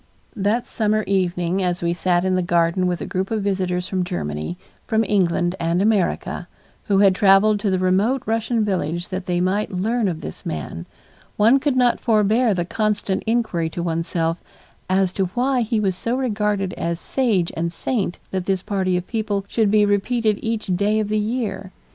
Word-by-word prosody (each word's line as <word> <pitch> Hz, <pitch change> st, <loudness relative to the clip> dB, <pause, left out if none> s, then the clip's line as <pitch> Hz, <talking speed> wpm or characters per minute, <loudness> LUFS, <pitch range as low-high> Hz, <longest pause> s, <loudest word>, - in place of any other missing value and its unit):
That 210 Hz, +4 st, 0 dB
summer 215 Hz, -1 st, 0 dB
evening 180 Hz, -1 st, 0 dB
as 175 Hz, -1 st, -1 dB
we 170 Hz, 0 st, +1 dB
sat 175 Hz, 0 st, +1 dB
in 185 Hz, -, +1 dB
the 185 Hz, -, +2 dB
garden 175 Hz, +1 st, +1 dB
with 175 Hz, -1 st, -2 dB
a -, -, -3 dB
group 190 Hz, +1 st, -2 dB
of 220 Hz, -2 st, -1 dB
visitors 185 Hz, -2 st, -1 dB
from 185 Hz, -2 st, -1 dB
Germany, 75 Hz, -, -4 dB, 0.3 s
from 220 Hz, -1 st, +2 dB
England 175 Hz, -3 st, +1 dB
and 170 Hz, +1 st, 0 dB
America, 205 Hz, -2 st, 0 dB, 0.4 s
who 200 Hz, -3 st, +2 dB
had 195 Hz, -1 st, +5 dB
traveled 200 Hz, +2 st, +4 dB
to 200 Hz, -, 0 dB
the 190 Hz, -, +1 dB
remote 195 Hz, +8 st, +1 dB
Russian 225 Hz, 0 st, 0 dB
village 175 Hz, -3 st, -2 dB
that 185 Hz, -1 st, -4 dB
they 175 Hz, -1 st, 0 dB
might 190 Hz, +4 st, 0 dB
learn 215 Hz, +4 st, 0 dB
of 165 Hz, -4 st, -3 dB
this 80 Hz, -, -8 dB
man, 80 Hz, +2 st, -5 dB, 0.5 s
one 230 Hz, +6 st, +5 dB
could 280 Hz, -1 st, 0 dB
not 245 Hz, -1 st, +3 dB
forbear 220 Hz, 0 st, +2 dB
the 175 Hz, -1 st, -1 dB
constant 205 Hz, 0 st, -1 dB
inquiry 220 Hz, -8 st, 0 dB
to 170 Hz, +1 st, -4 dB
one's 165 Hz, -1 st, -2 dB
self, 165 Hz, 0 st, -1 dB, 0.5 s
as 190 Hz, -1 st, +2 dB
to 195 Hz, -, 0 dB
why 255 Hz, +1 st, +1 dB
he 225 Hz, -1 st, 0 dB
was 195 Hz, -3 st, 0 dB
so 230 Hz, +6 st, -2 dB
regarded 210 Hz, -6 st, -1 dB
as 170 Hz, 0 st, -3 dB
sage 215 Hz, -10 st, 0 dB
and 170 Hz, +1 st, -2 dB
saint 195 Hz, -1 st, -2 dB
that 185 Hz, -1 st, -3 dB
this 190 Hz, -2 st, 0 dB
party 190 Hz, -3 st, 0 dB
of 180 Hz, -, -4 dB
people 210 Hz, -3 st, -2 dB
should 220 Hz, 0 st, +1 dB
be 210 Hz, 0 st, +4 dB
repeated 210 Hz, +1 st, +1 dB
each 225 Hz, -1 st, -2 dB
day 210 Hz, +4 st, +1 dB
of 210 Hz, -1 st, -2 dB
the 215 Hz, 0 st, +1 dB
year. 215 Hz, -3 st, -3 dB
195 Hz, 190 wpm, -21 LUFS, 180-215 Hz, 0.5 s, had